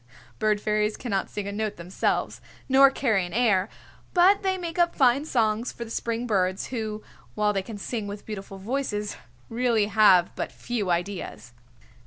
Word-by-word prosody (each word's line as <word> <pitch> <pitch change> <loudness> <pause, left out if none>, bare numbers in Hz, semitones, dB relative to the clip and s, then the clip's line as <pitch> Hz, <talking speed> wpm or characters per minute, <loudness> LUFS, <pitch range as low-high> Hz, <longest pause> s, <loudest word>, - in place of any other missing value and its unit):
Bird 215 -1 +2
Fairies 210 0 0
cannot 200 -6 -2
sing 205 -1 -5
a - - -3
note 215 0 -2
themselves, 175 +2 -2 0.3
nor 275 +1 +7
carry 225 -8 +1
an 175 - -7
air, 215 -4 +2 0.5
but 380 +3 +5
they 380 -1 0
make 345 -1 -5
up 345 0 +3
fine 265 +1 +3
songs 225 -4 0
for 235 - -7
the 225 - -11
spring 230 +1 -2
birds, 190 -4 0
who 215 -3 -4 0.3
while 210 0 +2
they 195 - 0
can 210 +2 -8
sing 215 +1 -4
with 205 0 -7
beautiful 195 -2 -7
voices 210 -1 -3 0.3
really 230 -2 +1
have 200 -4 +4
but - - -4
few 225 -6 -3
ideas. 175 -8 -3
215 Hz, 170 wpm, -26 LUFS, 200-245 Hz, 0.5 s, nor